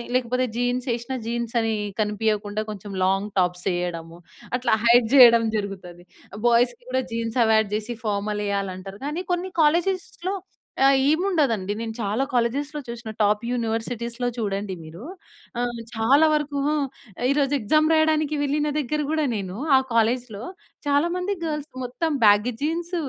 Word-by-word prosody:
లేకపోతే, 255 0 +1
జీన్స్ 245 +1 -1
ఏసినా 240 +2 -5
జీన్స్ 235 0 -3
అనీ 225 -1 0 0.3
కనిపియకుండా 210 0 -1
కొంచెం 205 -1 -8
లాంగ్ 195 +2 0
టాప్స్ 180 0 0
ఎయడము. 170 -1 -5 0.4
అట్లా 245 -3 +2
హైడ్ 235 -1 +5
చేయడం 235 -3 +8
జరుగుతది. 185 -4 -6 0.4
బాయ్స్‌కి 240 +1 +2
గూడా 260 0 +1
జీన్స్ 230 +1 -2
అవాయిడ్ 220 -1 +3
చేసి 220 +3 -4
ఫార్మల్ 210 0 -1
ఎయ్యాలి 200 -2 -1
అంటారు. 195 +2 -9
కానీ 305 +5 -3
కొన్ని 360 +2 -3
కాలేజెస్‌‌లో 355 +4 0 0.5
ఆహ్, 275 0 +5
ఏమి 315 +5 +2
ఉండదండి 230 - +1
నేను 225 -1 -4
చాలా 215 +5 0
కాలేజెస్‌‌లో 275 +5 0
చూసినా 235 -1 -6
టాప్ 210 0 +3
యూనివర్సిటీస్‌లో 235 0 -2
చూడండి 200 -2 -2
మీరు 160 +4 -11 0.6
ఆహ్, 240 -1 -2
చాలా 255 +7 +4
వరకూ 295 -1 -1 0.7
ఈరోజు 280 0 +2
ఎక్సామ్ 310 +8 +3
రాయడానికి 310 -1 +2
వెళ్ళిన 295 +1 0
దగ్గర 300 +2 -1
గూడా 310 -1 +1
నేను, 190 -3 -4 0.2
ఆ - - +5
కాలేజ్‌లో 230 -1 0 0.4
చాలా 285 +4 +3
మంది 365 +2 -1
గర్ల్స్ 300 -2 -4
మొత్తం 265 +7 -2
బ్యాగ్ 205 +3 +5
జీన్స్, 335 +4 -2
235 Hz, 140 wpm, -24 LUFS, 210-285 Hz, 0.7 s, చేయడం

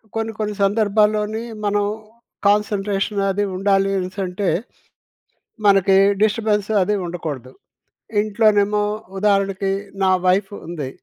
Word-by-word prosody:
కొన్ని 225 0 -2
కొన్ని 210 -1 -2
సందర్భాల్లోని 210 +1 +1 0.2
మనం 205 0 +1 0.6
కాన్సన్‌ట్రేషన్ 205 0 0
అది 205 +2 -1
ఉండాలి 195 0 +2
అనేసి 185 +1 -4
అంటే, 185 +2 -2 1.2
మనకి 195 -1 +5 0.3
డిస్టర్బెన్స్ 215 -1 +1
అది 210 +3 +1
ఉండకూడదు. 150 -7 -6 0.7
ఇంట్లోనేమో 210 -1 +2 0.3
ఉదాహరణకి 195 -1 +1 0.3
నా 190 - +4
వైఫ్ 190 +2 +2 0.2
ఉంది. 155 -6 -5
205 Hz, 100 wpm, -20 LUFS, 195-210 Hz, 1.2 s, మనకి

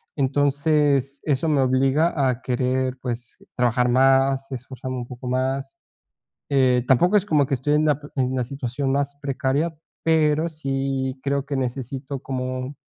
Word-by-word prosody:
entonces 145 0 +1
eso 150 +1 0
me 150 -2 +2
obliga 135 +5 +2 0.2
a 125 0 -2
querer, 130 0 -1
pues, 120 -1 -5 0.2
trabajar 125 0 +2
más, 135 +1 +3
esforzarme 130 0 -6
un 120 -1 -5
poco 125 +1 -8
más. 130 +2 -2 0.7
Eh, 130 -3 +3
tampoco 175 - +4
es 200 - +3
como 150 -6 +3
que 140 - 0
estoy 135 +3 0
en 155 +1 +3
la 150 -3 +2 0.2
en 130 -1 0
la 125 - 0
situación 135 +1 -3
más 140 0 -1
precaria, 140 +4 -1 0.3
pero 160 0 +3
sí 135 -3 -2
creo 140 0 0
que 145 -1 -2
necesito 135 +1 -4
como, 130 +1 -4
135 Hz, 150 wpm, -23 LUFS, 130-145 Hz, 0.7 s, tampoco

